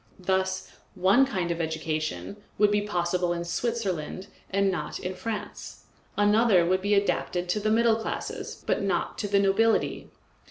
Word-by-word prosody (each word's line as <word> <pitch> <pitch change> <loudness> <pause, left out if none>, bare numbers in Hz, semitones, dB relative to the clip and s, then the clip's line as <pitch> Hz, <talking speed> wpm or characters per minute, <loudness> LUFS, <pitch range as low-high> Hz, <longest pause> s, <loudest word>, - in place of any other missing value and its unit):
Thus 190 0 -1 0.2
one 200 +9 +4
kind 185 -8 -2
of 170 0 -2
education 160 +3 -3 0.2
would 210 -1 +4
be 205 0 +2
possible 175 -3 0
in 170 0 -4
Switzerland 190 -4 -3 0.2
and 200 0 +2
not 180 - -4
in 185 - -4
France; 205 +3 -6 0.3
another 205 -3 +4
would 185 +2 +1
be 205 +1 +2
adapted 180 -2 0
to 210 - +1
the 215 +1 0
middle 225 0 +4
classes 225 - -5
but - - 0
not - - -1
to 205 - -1
the 200 0 +2
nobility. 200 +3 +2
195 Hz, 155 wpm, -27 LUFS, 180-210 Hz, 0.3 s, one